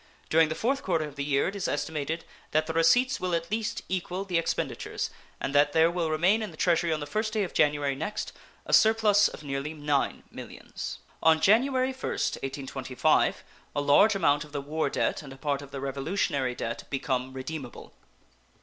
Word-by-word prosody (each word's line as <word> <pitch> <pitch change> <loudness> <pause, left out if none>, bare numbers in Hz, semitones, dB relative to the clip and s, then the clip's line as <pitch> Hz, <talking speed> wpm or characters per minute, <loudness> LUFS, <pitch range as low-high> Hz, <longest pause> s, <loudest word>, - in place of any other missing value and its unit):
During 160 0 +5
the 155 - -2
4th 270 - 0
quarter 165 -4 0
of 145 -2 -10
the 140 - -3
year 140 -1 +1
it 195 - -4
is 200 - -2
estimated 155 +2 -2 0.3
that 155 +1 +3
the 160 - -4
receipts 245 +11 +3
will 180 -2 0
at 170 +2 -3
least 220 0 -2
equal 185 +1 -3
the 180 -3 +1
expenditures, 165 - -3 0.3
and 135 - -3
that 145 0 +4
there 165 +1 +4
will 170 -2 -1
remain 175 +8 +3
in 215 - -3
the - - -14
Treasury 170 -1 +2
on 155 - 0
the - - -3
first 215 +6 -2
day 215 -2 +1
of 185 - -5
January 145 -1 +2
next 160 +10 -4 0.3
a - - -4
surplus 215 -2 +5
of - - -9
nearly 140 +2 -4
$9 145 -2 -1
millions. - - -7 0.2
On 160 0 +5
January 255 +7 +3
1st, 260 - -2
1825, 135 +1 0 0.3
a - - +1
large 145 +10 +5
amount 145 -6 +2
of 150 -1 -15
the 145 - -2
war 155 +3 -1
debt - - -1
and 140 -3 -11
a - - -13
part 140 -1 -1
of 140 - -10
the 140 0 -6
Revolutionary 135 -1 -1
debt 115 0 -4
become 130 -2 -2
redeemable. 130 -1 -7
155 Hz, 195 wpm, -28 LUFS, 140-190 Hz, 0.3 s, During